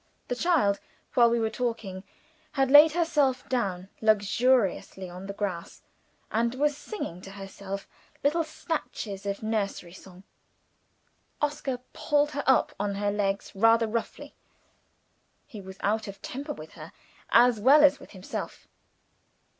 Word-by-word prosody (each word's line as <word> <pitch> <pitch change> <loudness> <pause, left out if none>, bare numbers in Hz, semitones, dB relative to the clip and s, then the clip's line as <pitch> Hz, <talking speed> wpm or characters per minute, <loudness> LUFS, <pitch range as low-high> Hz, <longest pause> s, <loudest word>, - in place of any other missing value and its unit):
The 245 - 0
child, 270 - +2 0.3
while 235 -2 +6
we 235 0 +1
were 220 -1 0
talking, 220 -6 -3 0.5
had 270 -1 +1
laid 300 +2 +9
herself 290 -7 +1
down 195 -8 -1
luxuriously 215 -2 +2
on 185 +2 -9
the - - -4
grass, 195 -4 -5 0.5
and 235 +2 0
was 295 +2 +1
singing 290 - -6
to 195 - -10
herself 195 0 -7 0.4
little 315 +4 +2
snatches 245 -11 -5
of 200 +2 -3
a - - -4
nursery 200 -5 -2
song. 185 0 -14 1.2
Oscar 290 -3 -1 0.2
pulled 295 0 +1
her 285 -1 -3
up 265 - +4
on 200 0 -1
her 205 0 0
legs 200 -1 -1
rather 225 +3 +4
roughly. 225 +1 -4 1.1
He 220 -8 -10
was 190 0 -11
out 215 +2 0
of 200 0 -8
temper 285 +3 -5
with - - -11
her, - - -11 0.4
as 240 -1 +5
well 280 +7 +6
as 280 -1 +5
with - - -14
himself. 190 -2 -7
225 Hz, 140 wpm, -27 LUFS, 200-270 Hz, 1.2 s, laid